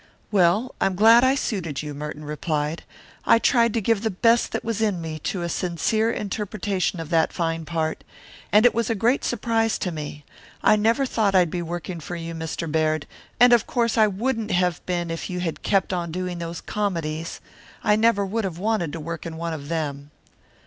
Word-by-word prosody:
"Well, 205 +5 +3
I'm 195 - +2
glad 225 +5 +7
I 260 +1 +4
suited 170 - -3
you," 150 -1 -5
Merton 150 +1 -6
replied. 150 +1 -2 0.4
"I - - +5
tried 235 0 +3
to 230 - +1
give 220 0 +1
the 220 - 0
best 230 +4 +2
that - - -3
was 225 -2 -2
in 205 -5 +1
me 160 -1 -5
to 180 -3 -2
a - - -1
sincere 185 +6 0
interpretation 205 -3 -2
of 165 -2 -6
that 165 -1 +3
fine 165 -1 -2
part. 160 -1 -2 0.5
And 210 +3 +6
it 245 - +6
was 230 0 0
a 230 - +1
great 235 +6 +2
surprise 225 -1 0
to 180 - -2
me. 150 -2 -7 0.4
I 215 - +6
never 225 +6 +2
thought 215 -6 +1
I'd 180 -4 +4
be 175 - -2
working 175 +1 -5
for 175 +2 -6
you, 165 0 -5
Mr. 160 0 -4
Baird, 155 -1 +1 0.3
and 245 +1 +7
of 235 -2 +4
course 235 -2 +1
I 220 -2 +5
wouldn't 225 +3 -2
have 180 -2 +1
been 175 -2 -1
if 165 - -4
you 180 -1 -3
had 170 -3 -3
kept 195 -1 +1
on 170 -2 -2
doing 180 0 -3
those 170 0 -5
comedies. 165 -6 -3 0.4
I 210 - +4
never 220 -2 +3
would 220 +3 -2
have 185 -4 -3
wanted 195 -5 -1
to 165 - -4
work 165 +2 -5
in 160 -1 -7
one 170 0 -3
of 145 -2 -7
them." 145 -3 -3
180 Hz, 205 wpm, -24 LUFS, 165-220 Hz, 0.5 s, glad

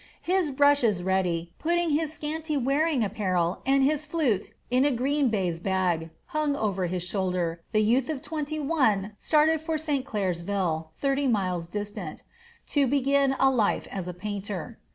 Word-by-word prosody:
His 365 -2 +1
brushes 265 -9 +3
ready, 175 -3 0
putting 340 0 +1
his 305 +1 +1
scanty 310 0 -3
wearing 275 +1 +1
apparel 185 -4 0
and 270 0 +4
his 300 +2 +2
flute 300 - 0 0.2
in 255 +1 +4
a 290 - +4
green 275 +2 +1
baize 185 -6 -1
bag, 175 -3 0 0.2
hung 305 -4 -1
over 195 -7 -1
his 180 0 -2
shoulder, 180 -3 -1
the 215 - +3
youth 245 +5 +2
of 305 -4 -2
twenty 310 0 -3
one 255 -10 +1
started 310 0 +3
for 315 0 -1
St. 295 -4 -1
Clairsville, 180 - -1
thirty 275 0 +1
miles 185 -7 0
distant, 205 -3 -6 0.5
to 285 -2 +3
begin 275 0 +2
life 260 -6 +2
as 190 -3 -4
a 180 - -4
painter. 205 +2 -5
240 Hz, 155 wpm, -27 LUFS, 190-290 Hz, 0.5 s, and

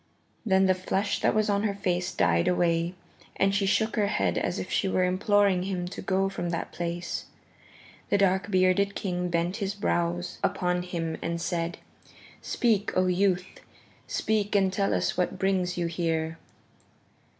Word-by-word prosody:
Then 190 -3 +3
the 190 - +4
flush 190 +2 -1
that - - +2
was 215 0 +2
on 200 -1 +1
her 205 -2 -1
face 180 -3 -1
died 85 0 +2
away, 170 0 +1 0.4
and 195 0 +2
she 200 0 +1
shook 220 +2 +1
her 210 -3 +2
head 95 - 0
as 90 - -1
if 95 - -5
she - - +1
were 185 - +2
imploring 195 0 +3
him 180 -1 -3
to - - -7
go 190 0 +1
from 195 -3 -3
that 170 -1 -3
place. 175 0 -4 0.8
The - - +3
dark 190 0 +2
bearded 190 +1 +2
king 180 -2 -2
bent 175 +3 0
his 200 -1 -2
brows 175 -3 -1
upon 180 0 0
him 165 -3 -3
and 170 0 -2
said, 170 0 -2 0.6
"Speak, 215 -4 +1
O 185 - +4
youth, 185 0 0 0.5
speak 210 -1 0
and 190 -2 +3
tell 195 +1 +1
us - - -1
what 180 - 0
brings 185 -2 0
you 175 - 0
here." 165 -1 -2
185 Hz, 165 wpm, -27 LUFS, 175-200 Hz, 0.8 s, the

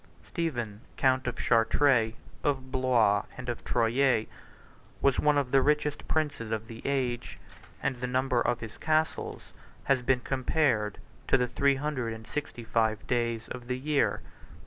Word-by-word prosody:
Stephen, 120 - -3 0.2
count 130 -1 +2
of 125 - -1
Chartres, 115 0 +3 0.3
of 130 -2 -1
Blois, 120 -6 +3
and 125 -1 -6
of 120 - -4
Troyes, 120 0 +2 0.7
was 140 -2 +3
one 150 -1 +3
of 135 -3 0
the 135 - +5
richest 150 +1 0
princes 145 -8 -1
of 110 0 -3
the 115 0 -9
age; 130 -3 -1 0.5
and 130 - 0
the 125 +1 -3
number 130 -1 +1
of 120 -1 0
his 110 -1 -8
castles 155 0 -1 0.3
has 135 -2 +2
been 125 0 +2
compared 130 -5 +1 0.3
to - - +5
the 125 - +2
three 140 +2 +2
hundred 135 -5 -2
and 110 0 -9
sixty 145 -4 -5
five 110 -1 0
days 115 -2 -1
of 125 -1 -7
the 125 0 -1
year. 145 +2 +1
125 Hz, 155 wpm, -29 LUFS, 115-140 Hz, 0.7 s, the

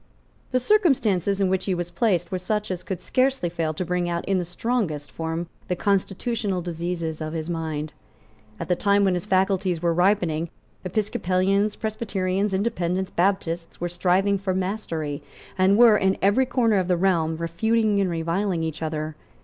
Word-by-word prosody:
The 255 - +2
circumstances 240 - +2
in 195 - +3
which 185 0 0
he 190 - 0
was 175 0 -4
placed 175 -2 +1
were 185 - -1
such 210 +2 -2
as 180 -1 -3
could 185 -1 -5
scarcely 260 -8 +1
fail 165 -2 -1
to 185 - -2
bring 175 0 -1
out 170 0 -2
in 195 -1 +1
the 175 - -2
strongest 175 - -2
form 165 +1 -3 0.2
the 180 - 0
constitutional 200 +1 -1
diseases 170 -2 -4
of 155 0 -4
his 165 +1 -3
mind. 155 -2 -3 0.7
At - - -4
the 180 - +2
time 200 +2 +3
when 190 -2 +3
his 180 +2 -3
faculties 190 -2 +1
were 170 0 +1
ripening, 175 -3 +1 0.3
Episcopalians, 195 +1 0
Presbyterians, 200 -3 -1
Independents, 190 -2 -1
Baptists, 175 -2 -1
were 175 - -1
striving 185 +3 +2
for 190 -1 -1
mastery, 175 -7 -3 0.3
and 190 +2 +4
were, 230 -3 +7
in 190 -1 +1
every 210 +7 +3
corner 235 -4 +2
of 185 -2 0
the 180 -1 +2
realm, 170 -3 +1
refuting 205 +5 +1
and 190 - +1
reviling 170 +2 -1
each 160 -1 -4
other. 155 -1 -3
185 Hz, 170 wpm, -24 LUFS, 170-200 Hz, 0.7 s, were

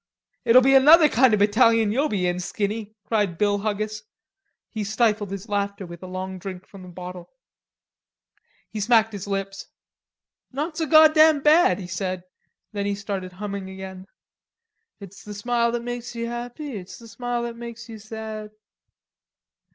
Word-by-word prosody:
"It'll 250 +2 +7
be 270 +1 +4
another 305 +4 +8
kind 260 -2 +4
of 210 - +2
a 205 - +6
battalion 225 0 +3
you'll 280 +7 +1
be 190 -4 -1
in, 180 0 0
Skinny," 210 +3 -4
cried 205 -6 0
Bill 205 +1 +1
Huggis. 215 +1 -3 0.7
He 215 -2 -5
stifled 215 -1 0
his 195 +2 -7
laughter 200 -1 -2
with 170 -1 -11
a 185 - -8
long 185 0 -6
drink 185 0 -8
from 195 - -14
the 185 - -11
bottle. 180 0 -9 1.4
He 215 - -7
smacked 225 0 +3
his 200 -1 -6
lips. 195 0 -4 0.8
"Not 300 +5 -3
so 320 -1 -2
goddam 310 0 +6
bad," 325 +6 +5
he 195 - -7
said. 185 0 -4 0.5
Then 200 -1 -3
he 200 - -1
started 195 -2 -5
humming 200 0 -6
again: 190 0 -9 0.9
"It's 200 -1 -12
the 210 0 -8
smile 235 +2 0
that 240 -1 -2
makes 240 0 -6
you 230 0 -3
happy, 240 +3 -6
It's 180 -2 -10
the 230 - -13
smile 245 +1 -3
that 235 -1 -5
makes 235 0 -9
you 225 -2 -9
sad." 215 0 -7
215 Hz, 165 wpm, -24 LUFS, 195-240 Hz, 1.4 s, another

